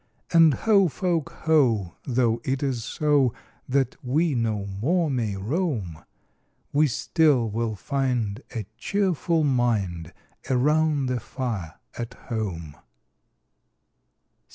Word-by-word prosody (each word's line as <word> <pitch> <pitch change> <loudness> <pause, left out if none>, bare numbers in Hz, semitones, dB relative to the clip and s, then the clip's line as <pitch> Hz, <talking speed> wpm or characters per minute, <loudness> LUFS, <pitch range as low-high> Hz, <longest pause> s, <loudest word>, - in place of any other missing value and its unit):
And 165 -4 +6
ho, 200 -4 +4
folk, 170 -1 -1
ho! 120 - +3
though 120 -2 +1
it 135 +1 -1
is 130 -5 -1
so 145 -2 +1 0.3
That 135 -1 0
we 150 +5 +1
no 110 -4 -1
more 145 - 0
may 115 -6 -1
roam, 105 - -2 0.7
We 150 +2 +4
still 140 -2 +2
will 115 0 -2
find 125 -3 -1
a 110 -3 -3
cheerful 180 -5 +1
mind 110 - 0 0.4
Around 150 +2 +2
the 125 -1 -1
fire 105 - -4 0.2
at 120 +1 -6
home! 90 - -5
125 Hz, 105 wpm, -25 LUFS, 110-150 Hz, 0.7 s, And